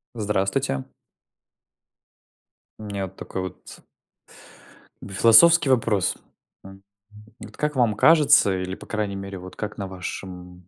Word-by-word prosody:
Здравствуйте. 95 - -1 2.0
У - - -10
меня 100 -2 -4
вот 95 - -17
такой 95 - -6
вот 95 -2 -10 1.2
в 95 - -10
философский 135 - +6
вопрос. 110 -7 +1 0.5
М, 95 0 -14 0.6
вот - - -12
как 150 -1 -2
вам 115 -4 +2
кажется 145 -6 +5
или, 95 0 -5
по-крайней 105 -2 -4
мере, 100 0 -7
вот, 90 +1 -11
как 105 -1 -6
на 100 -2 -5
вашем 90 -1 -9
100 Hz, 120 wpm, -23 LUFS, 95-115 Hz, 2.0 s, философский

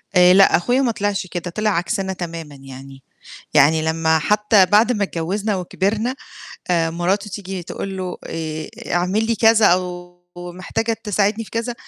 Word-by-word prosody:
آآ 180 0 +7
لأ، 195 +1 +6
أخويا 245 +9 +1
ما 250 -3 +1
طلعش 205 -3 -2
كده، 175 0 -5
طلع 215 +5 -1
عكسنا 190 +1 -1
تمامًا 165 -4 -7
يعني، 135 0 -12 0.5
يعني 155 +3 +5
لمّا 160 0 +1
حتى 210 +3 +3
بعد 215 +5 +4
ما 205 -4 0
اتجوزنا 195 +4 -2
وكبرنا 205 +6 -2 0.6
آآ 165 -2 +2
مراته 185 +5 -1
تيجي 190 -2 -6
تقول 195 +3 -6
له: 185 -1 -5
"آآ 155 -1 -5 0.2
اعمل 185 +5 +1
لي 230 0 0
كذا، 225 0 +4
أو 175 -1 0 0.2
محتاجة 185 +6 -3
تساعدني 210 +1 0
في - - -15
كذا." 230 +1 -3
185 Hz, 155 wpm, -20 LUFS, 170-210 Hz, 0.6 s, آآ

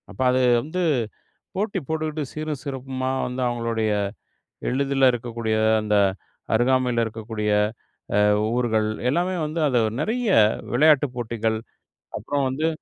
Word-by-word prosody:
அப்ப - - -8
அது 130 0 +2 0.2
வந்து 160 +8 -3 0.7
போட்டி 200 0 -1
போட்டுட்டு 155 -1 -2
சீரும் 155 -2 -4
சிறப்புமா 130 -1 -3 0.2
வந்து, 125 +1 -4
அவங்களுடய 115 -2 -1 0.8
எளிதுல 135 0 +3
இருக்கக்கூடிய 115 -2 -2 0.3
அந்த 105 0 0 0.6
அருகாமையில 125 0 +2
இருக்கக்கூடிய 110 -1 -3 0.7
அ, - - +5 0.3
ஊர்கள் 110 -3 +1 0.2
எல்லாமே 175 +7 +1
வந்து 155 +2 -3
அத 130 - 0 0.2
நெறய 225 +6 0 0.4
விளையாட்டுப் 145 0 +4
போட்டிகள், 110 -2 -1 0.6
அப்புறம் 145 -1 -1
வந்து 150 +5 -1
130 Hz, 110 wpm, -23 LUFS, 115-150 Hz, 0.8 s, அ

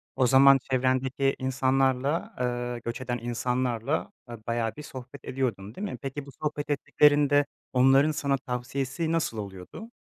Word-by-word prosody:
O 130 -2 +3
zaman 135 +2 +7
çevrendeki 130 +1 +1
insanlarla, 130 +3 +1
ııı, 120 -1 -2
göç 120 +2 -4
eden 125 -1 -2
insanlarla, 120 +2 -1 0.2
a 120 -1 -8
bayağı 115 -1 -1
bir 150 - -9
sohbet 130 -2 -10
ediyordun, 115 -5 -3
değil 205 - -4
mi? - - -6
Peki, 135 +1 -5
bu - - -12
sohbet 150 +1 -4
ettiklerinde 145 0 +3 0.3
onların 135 +4 +5
sana 140 -2 0
tavsiyesi 135 +4 -3
nasıl 165 -9 0
oluyordu? 100 - -8
130 Hz, 145 wpm, -27 LUFS, 125-140 Hz, 0.3 s, zaman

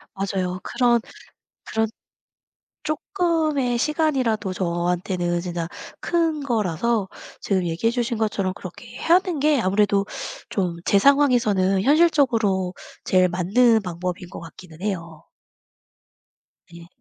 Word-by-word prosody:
맞아요. 190 -2 -2
그런 240 -2 +2 0.7
그런 220 0 0 1.0
쪼끔의 310 - 0
시간이라도 260 - 0
저한테는 175 0 -1
진짜 170 -2 -4 0.3
큰 330 -3 0
거라서 220 - 0 0.3
지금 190 -3 0
얘기해 175 +7 0
주신 240 -1 -1
것처럼 200 -4 -1
그렇게 - - -10
하는 350 -1 +2
게 295 0 +3
아무래도 200 -1 +2 0.4
좀 180 -4 -1
제 200 - +4
상황에서는 215 -8 +3
현실적으로 235 - +3 0.3
제일 185 -1 +3
맞는 215 +6 +3
방법인 180 0 -5
것 - - -8
같기는 165 0 -13
해요. 170 -6 -5 1.4
네. 170 0 -12
205 Hz, 250 characters per minute, -23 LUFS, 180-260 Hz, 1.4 s, 제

